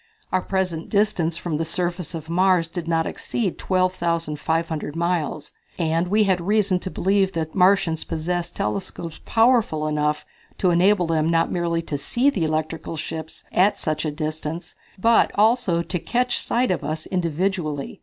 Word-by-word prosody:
Our 185 Hz, -, +2 dB
present 180 Hz, -4 st, -2 dB
distance 200 Hz, -6 st, +1 dB
from 165 Hz, -3 st, -2 dB
the 165 Hz, -, 0 dB
surface 175 Hz, 0 st, -3 dB
of 160 Hz, -1 st, -7 dB
Mars 180 Hz, 0 st, +3 dB
did 170 Hz, -1 st, -6 dB
not 165 Hz, -1 st, +1 dB
exceed 210 Hz, -7 st, -3 dB
12,500 165 Hz, -4 st, -1 dB
miles, 165 Hz, -3 st, -1 dB, 0.3 s
and 165 Hz, +1 st, +1 dB
we 210 Hz, +3 st, +3 dB
had 190 Hz, -3 st, +2 dB
reason 200 Hz, 0 st, +2 dB
to 185 Hz, -, -5 dB
believe 195 Hz, +1 st, +1 dB
that 160 Hz, -2 st, -3 dB
Martians 180 Hz, -4 st, +3 dB
possessed 175 Hz, +2 st, -3 dB
telescopes 165 Hz, -, -4 dB
powerful 225 Hz, -9 st, +3 dB
enough 150 Hz, 0 st, 0 dB, 0.3 s
to 185 Hz, -, +2 dB
enable 180 Hz, +2 st, +4 dB
them 160 Hz, -1 st, +1 dB
not 165 Hz, 0 st, +2 dB
merely 170 Hz, -1 st, 0 dB
to 145 Hz, -3 st, -3 dB
see 255 Hz, -, +2 dB
the 180 Hz, -11 st, -1 dB
electrical 155 Hz, +1 st, -2 dB
ships 160 Hz, +1 st, -6 dB
at 200 Hz, +3 st, +3 dB
such 155 Hz, -4 st, -2 dB
a 155 Hz, -, 0 dB
distance, 155 Hz, +2 st, -4 dB, 0.2 s
but 225 Hz, +4 st, +4 dB
to -, -, -15 dB
also 210 Hz, -6 st, +3 dB
catch 235 Hz, +9 st, -1 dB
sight 245 Hz, -2 st, +1 dB
of 180 Hz, -, -1 dB
us 155 Hz, 0 st, -3 dB
individually. 170 Hz, -4 st, -2 dB
170 Hz, 155 wpm, -23 LUFS, 160-190 Hz, 0.3 s, enable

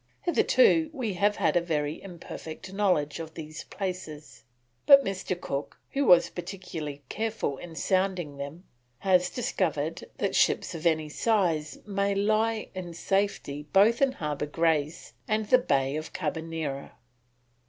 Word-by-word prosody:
Hitherto 345 Hz, -2 st, +4 dB
we 245 Hz, -8 st, -2 dB
have 205 Hz, +3 st, +2 dB
had -, -, +1 dB
a 175 Hz, -, +4 dB
very 155 Hz, -2 st, -2 dB
imperfect 175 Hz, -1 st, -9 dB
knowledge 180 Hz, -8 st, +1 dB
of 160 Hz, -1 st, -7 dB
these 155 Hz, -1 st, -7 dB
places, 180 Hz, -6 st, -6 dB, 0.4 s
but 280 Hz, -1 st, +9 dB
Mr. 190 Hz, -2 st, -3 dB
Cook, 140 Hz, -4 st, -4 dB
who 280 Hz, 0 st, +1 dB
was 175 Hz, -6 st, +6 dB
particularly 170 Hz, -6 st, -6 dB
careful 220 Hz, -, -2 dB
in 170 Hz, -2 st, -9 dB
sounding 185 Hz, -5 st, 0 dB
them, 140 Hz, +5 st, -7 dB, 0.4 s
has 180 Hz, -2 st, +3 dB
discovered 165 Hz, -, -2 dB
that -, -, -1 dB
ships -, -, +2 dB
of 165 Hz, 0 st, -1 dB
any 155 Hz, -2 st, +1 dB
size 165 Hz, -5 st, +1 dB
may 200 Hz, -1 st, 0 dB
lie 215 Hz, +2 st, +1 dB
in 175 Hz, -3 st, -6 dB
safety 170 Hz, -7 st, -1 dB
both 215 Hz, +6 st, +5 dB
in 270 Hz, -1 st, +4 dB
Harbour 150 Hz, -, -3 dB
Grace 160 Hz, 0 st, 0 dB
and 215 Hz, 0 st, +1 dB
the 255 Hz, -, +7 dB
Bay 135 Hz, -, +1 dB
of 155 Hz, -, -6 dB
Carbonera." 160 Hz, -4 st, -4 dB
175 Hz, 140 wpm, -28 LUFS, 155-200 Hz, 0.4 s, but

